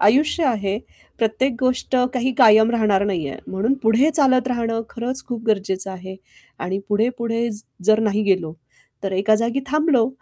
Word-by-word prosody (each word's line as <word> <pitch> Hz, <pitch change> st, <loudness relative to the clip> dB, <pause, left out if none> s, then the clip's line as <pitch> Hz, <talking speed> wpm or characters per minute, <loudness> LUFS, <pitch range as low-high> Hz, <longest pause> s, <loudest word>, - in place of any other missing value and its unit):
आयुष्य 295 Hz, +9 st, +3 dB
आहे, 205 Hz, -4 st, -1 dB, 0.4 s
प्रत्येक 235 Hz, +3 st, 0 dB
गोष्ट 255 Hz, 0 st, 0 dB, 0.2 s
काही 255 Hz, +1 st, 0 dB
कायम 220 Hz, -2 st, +6 dB
राहणार 215 Hz, -4 st, +2 dB
नाहीये, 165 Hz, -9 st, -3 dB
म्हणून 210 Hz, +8 st, 0 dB
पुढे 230 Hz, +7 st, +3 dB
चालत 260 Hz, -4 st, +3 dB
राहणं 230 Hz, -2 st, -1 dB
खरंच 250 Hz, +3 st, -4 dB
खूप 240 Hz, -3 st, -4 dB
गरजेचं 195 Hz, -3 st, -1 dB
आहे. 190 Hz, 0 st, -9 dB, 0.4 s
आणि 190 Hz, +2 st, -3 dB
पुढे-पुढे 230 Hz, +2 st, 0 dB
ज 210 Hz, 0 st, -3 dB, 0.2 s
जर 215 Hz, +2 st, +4 dB
नाही 215 Hz, -1 st, +1 dB
गेलो, 185 Hz, -5 st, 0 dB, 0.5 s
तर 195 Hz, -1 st, -3 dB
एका 200 Hz, +3 st, +2 dB
जागी 230 Hz, +4 st, -1 dB
थांबलो 290 Hz, -5 st, +2 dB
225 Hz, 155 wpm, -21 LUFS, 200-255 Hz, 0.5 s, कायम